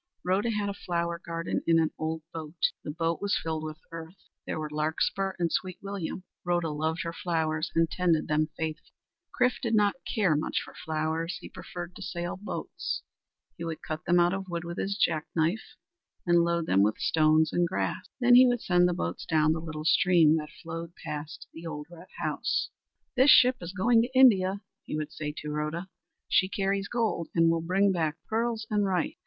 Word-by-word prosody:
Rhoda 190 Hz, +5 st, +1 dB
had 210 Hz, -2 st, -1 dB
a 200 Hz, -, -2 dB
flower 170 Hz, -2 st, -2 dB
garden 165 Hz, 0 st, -2 dB
in 165 Hz, 0 st, +5 dB
an 160 Hz, -1 st, +2 dB
old 160 Hz, 0 st, -2 dB
boat. 160 Hz, 0 st, -1 dB
The -, -, -6 dB
boat 165 Hz, +2 st, -1 dB
was 200 Hz, 0 st, +1 dB
filled 160 Hz, -1 st, -3 dB
with 155 Hz, 0 st, -5 dB
earth. 165 Hz, +2 st, -8 dB, 0.3 s
There -, -, -2 dB
grew 155 Hz, -1 st, -3 dB
larkspur 160 Hz, +5 st, 0 dB
and 170 Hz, -2 st, 0 dB
sweet 185 Hz, -1 st, -2 dB
william. 195 Hz, -2 st, -5 dB, 0.2 s
Rhoda 175 Hz, -2 st, 0 dB
loved 160 Hz, +2 st, -1 dB
her 170 Hz, -, -4 dB
flowers 160 Hz, -2 st, -1 dB
and 165 Hz, 0 st, +4 dB
tended 170 Hz, -2 st, +1 dB
them 155 Hz, +1 st, +1 dB
faithfully. 160 Hz, -1 st, -5 dB, 0.4 s
Chrif 250 Hz, 0 st, +2 dB
did 230 Hz, -3 st, +1 dB
not 205 Hz, -1 st, +4 dB, 0.2 s
care 200 Hz, -9 st, +2 dB
much 150 Hz, -, 0 dB
for -, -, -9 dB
flowers. 160 Hz, +3 st, -2 dB
He -, -, -10 dB
preferred 175 Hz, 0 st, -8 dB
to -, -, -10 dB
sail 175 Hz, -2 st, -4 dB
boats. 205 Hz, +3 st, -5 dB, 0.5 s
He 170 Hz, -, -6 dB
would 165 Hz, -1 st, -5 dB
cut 155 Hz, 0 st, -5 dB
them 175 Hz, 0 st, +4 dB
out 175 Hz, +1 st, +4 dB
of 195 Hz, 0 st, -4 dB
wood 170 Hz, -1 st, -3 dB
with 170 Hz, 0 st, -5 dB
his 200 Hz, +1 st, -1 dB
jack 160 Hz, -7 st, +1 dB
knife, 170 Hz, +7 st, -1 dB, 0.5 s
and 175 Hz, -1 st, +4 dB
load 170 Hz, -1 st, 0 dB
them 95 Hz, -6 st, +3 dB
with 105 Hz, +2 st, +2 dB
stones 155 Hz, 0 st, +3 dB
and 175 Hz, 0 st, +2 dB
grass. 185 Hz, -, -2 dB
Then 245 Hz, -1 st, +5 dB
he 255 Hz, +1 st, +9 dB
would 245 Hz, -1 st, +1 dB
send 180 Hz, -1 st, +4 dB
the 175 Hz, -, -1 dB
boats 85 Hz, -, -3 dB
down 155 Hz, -1 st, +3 dB
the 160 Hz, -, -3 dB
little 155 Hz, -2 st, -6 dB
stream 165 Hz, -2 st, +5 dB
that 150 Hz, -1 st, -4 dB
flowed 165 Hz, 0 st, -6 dB
past 150 Hz, +2 st, -6 dB
the 165 Hz, +1 st, -8 dB
old 150 Hz, -2 st, -5 dB
red 170 Hz, -1 st, -12 dB
house. -, -, -1 dB, 0.4 s
"This 260 Hz, +2 st, +5 dB
ship 255 Hz, -1 st, +7 dB
is 175 Hz, 0 st, -5 dB
going 225 Hz, +4 st, +4 dB
to 255 Hz, +2 st, -2 dB
India," 200 Hz, -6 st, +5 dB, 0.2 s
he -, -, -5 dB
would 155 Hz, 0 st, -4 dB
say 150 Hz, -2 st, -4 dB
to 150 Hz, 0 st, -5 dB
Rhoda. 155 Hz, +5 st, -3 dB, 0.4 s
"She 185 Hz, -, +3 dB
carries 195 Hz, 0 st, -1 dB
gold 225 Hz, -8 st, -1 dB
and 165 Hz, -1 st, +5 dB
will 165 Hz, 0 st, 0 dB
bring 195 Hz, +4 st, +2 dB
back 160 Hz, -4 st, 0 dB
pearls 225 Hz, 0 st, -1 dB
and 210 Hz, -1 st, +2 dB
rice." 185 Hz, -3 st, 0 dB
170 Hz, 200 wpm, -28 LUFS, 160-195 Hz, 0.5 s, he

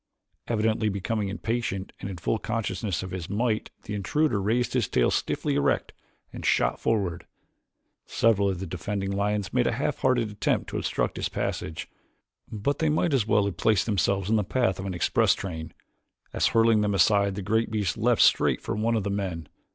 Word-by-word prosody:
Evidently 110 Hz, -1 st, +1 dB
becoming 100 Hz, +1 st, -2 dB
impatient, 105 Hz, -2 st, -3 dB
and 100 Hz, -, -5 dB
in 95 Hz, -, -6 dB
full 110 Hz, +6 st, -1 dB
consciousness 100 Hz, -6 st, -2 dB
of 95 Hz, -, -7 dB
his 90 Hz, -3 st, -5 dB
might 110 Hz, +1 st, 0 dB
the 105 Hz, -, -6 dB
intruder 105 Hz, +4 st, 0 dB
raised 115 Hz, +5 st, 0 dB
his 125 Hz, -5 st, +1 dB
tail 60 Hz, -, +2 dB
stiffly -, -, -1 dB
erect 70 Hz, 0 st, 0 dB, 0.4 s
and -, -, -7 dB
shot -, -, +2 dB
forward. 95 Hz, -7 st, -1 dB, 0.8 s
Several 105 Hz, -3 st, +2 dB
of 95 Hz, -2 st, -3 dB
the 95 Hz, -, -4 dB
defending 95 Hz, +3 st, -3 dB
lions 100 Hz, 0 st, -1 dB
made 125 Hz, -1 st, +2 dB
a -, -, +1 dB
half 145 Hz, +5 st, -2 dB
hearted 120 Hz, -5 st, +1 dB
attempt 105 Hz, -1 st, -1 dB
to -, -, -2 dB
obstruct -, -, -1 dB
his -, -, -2 dB
passage, 80 Hz, -, -3 dB, 0.6 s
but 110 Hz, +7 st, -1 dB
they 160 Hz, -, +2 dB
might 155 Hz, +1 st, +1 dB
as 120 Hz, -6 st, +2 dB
well 105 Hz, -2 st, +3 dB
have 100 Hz, -, -3 dB
placed 110 Hz, -3 st, +2 dB
themselves 100 Hz, -2 st, +1 dB
in 110 Hz, +1 st, +3 dB
the 105 Hz, -, +1 dB
path 110 Hz, -2 st, 0 dB
of 95 Hz, -, -4 dB
an 95 Hz, -, -3 dB
express 85 Hz, -, +3 dB
train, 80 Hz, -4 st, -6 dB, 0.6 s
as -, -, +2 dB
hurling 115 Hz, -1 st, +4 dB
them 105 Hz, -1 st, +1 dB
aside 100 Hz, +1 st, +3 dB
the 100 Hz, -, -4 dB
great 110 Hz, +4 st, +1 dB
beast 105 Hz, -5 st, -1 dB
leaped 120 Hz, +1 st, +2 dB
straight -, -, +4 dB
for -, -, -4 dB
one 115 Hz, +2 st, +1 dB
of 110 Hz, -, 0 dB
the 100 Hz, -, -2 dB
men. 90 Hz, -6 st, -3 dB
105 Hz, 190 wpm, -26 LUFS, 95-115 Hz, 0.8 s, hurling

